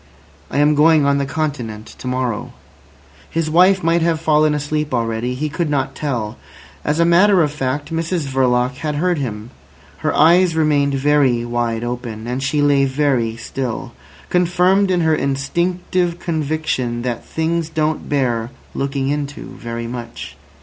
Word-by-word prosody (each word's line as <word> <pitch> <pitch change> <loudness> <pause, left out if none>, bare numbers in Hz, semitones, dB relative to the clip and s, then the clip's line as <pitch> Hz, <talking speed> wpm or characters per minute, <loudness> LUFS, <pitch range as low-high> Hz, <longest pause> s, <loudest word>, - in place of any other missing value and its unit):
"I - - -3
am 145 +1 +4
going 155 0 +5
on 140 0 +2
the 140 - -1
Continent 130 -7 -3
to - - -7
morrow." 125 -3 -2 0.8
His 160 -1 -1
wife 185 +3 +5
might 165 +1 +2
have 165 -1 +1
fallen 155 -1 +3
asleep 150 -1 -2
already. 115 +1 -1
He 150 +4 -2
could 165 +1 -2
not 135 -2 -1
tell. 120 -7 -3 0.5
As 150 +2 0
a 170 - +5
matter 180 +2 +5
of 150 - 0
fact, 145 +2 -3
Mrs 165 0 -1
Verloc 130 -1 +1
had 150 0 -3
heard 175 +1 +1
him. 110 -3 -5 0.5
Her - - -1
eyes 170 +2 +5
remained 145 -3 +2
very 135 -4 +2
wide 120 -1 -1
open, 120 -2 -5
and 125 +2 -3
she 145 +2 +1
lay 140 -1 +4
very 130 -5 0
still, 120 0 -4 0.4
confirmed 180 +2 +3
in 180 -2 +2
her 160 -1 +3
instinctive 170 +5 -1
conviction 155 -7 -2
that 120 -2 -3
things 165 0 -2
don't 155 -1 -1
bear 120 -5 0 0.2
looking 135 0 -2
into 145 0 -4
very 115 0 -5
much. 120 0 -7
145 Hz, 155 wpm, -19 LUFS, 125-160 Hz, 0.8 s, going